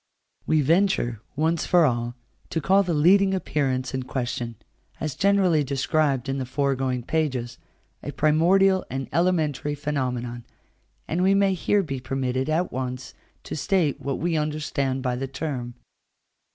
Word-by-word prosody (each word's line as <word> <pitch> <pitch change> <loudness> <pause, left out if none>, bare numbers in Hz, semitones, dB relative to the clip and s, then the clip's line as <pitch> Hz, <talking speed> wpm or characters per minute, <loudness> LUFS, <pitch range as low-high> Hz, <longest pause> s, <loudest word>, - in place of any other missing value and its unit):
We 155 -1 +3
venture, 150 - +1
once 160 +2 0
for 175 -2 +5
all, 120 -2 -1 0.3
to 165 - -1
call 195 +4 +4
the 175 -4 -1
leading 190 +5 +4
appearance 135 -8 -1
in 130 - -1
question, 120 -2 -3 0.4
as 155 -2 -3
generally 190 -5 +3
described 140 -1 0
in 135 0 -2
the 130 - -2
foregoing 130 -2 -1
pages, 130 -5 -2 0.4
a - - -5
primordial 185 +5 +3
and 135 0 -4
elementary 155 -4 +1
phenomenon; 125 -5 -3 0.6
and 170 +3 -1
we 190 +1 +4
may 195 -1 +3
here 195 +3 +1
be 135 -6 -4
permitted 130 +1 -2
at 170 +3 0
once 125 0 -5 0.3
to - - -6
state 155 -2 0
what 140 -1 -2
we 170 0 -1
understand 150 -3 -1
by 125 -2 0
the 135 +2 -3
term. 130 -4 -5
145 Hz, 145 wpm, -25 LUFS, 130-170 Hz, 0.6 s, for